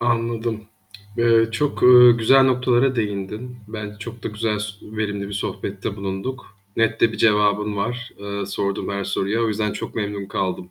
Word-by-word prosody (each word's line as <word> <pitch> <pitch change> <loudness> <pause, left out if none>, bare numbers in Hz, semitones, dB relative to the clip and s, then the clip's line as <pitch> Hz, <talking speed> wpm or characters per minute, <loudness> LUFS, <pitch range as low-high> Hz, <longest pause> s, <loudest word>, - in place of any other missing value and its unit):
Anladım. 115 -2 -1 0.5
Eee, 115 -1 +4
çok, 145 +6 -1
ııı, 125 -1 +8
güzel 135 +4 +5
noktalara 125 0 +2
değindin. 105 +3 -4
Bence 105 -2 -7
çok 115 +1 -9
da - - -3
güzel, 105 0 -2
s 105 - -3 0.2
verimli 105 -2 -4
bir - - -8
sohbette 100 0 -4
bulunduk. 100 +4 -5 0.2
Net 115 0 +1
de 115 - +4
bir - - -6
cevabın 105 -1 +2
var. 120 +4 -3
Eee, 100 -1 -5
sorduğum 100 0 -2
her 100 -1 -3
soruya. 100 +3 -1
O - - +1
yüzden 105 0 -1
çok - - -6
memnun 100 -2 -3
kaldım. 90 -2 -3
110 Hz, 170 wpm, -22 LUFS, 100-120 Hz, 0.5 s, ııı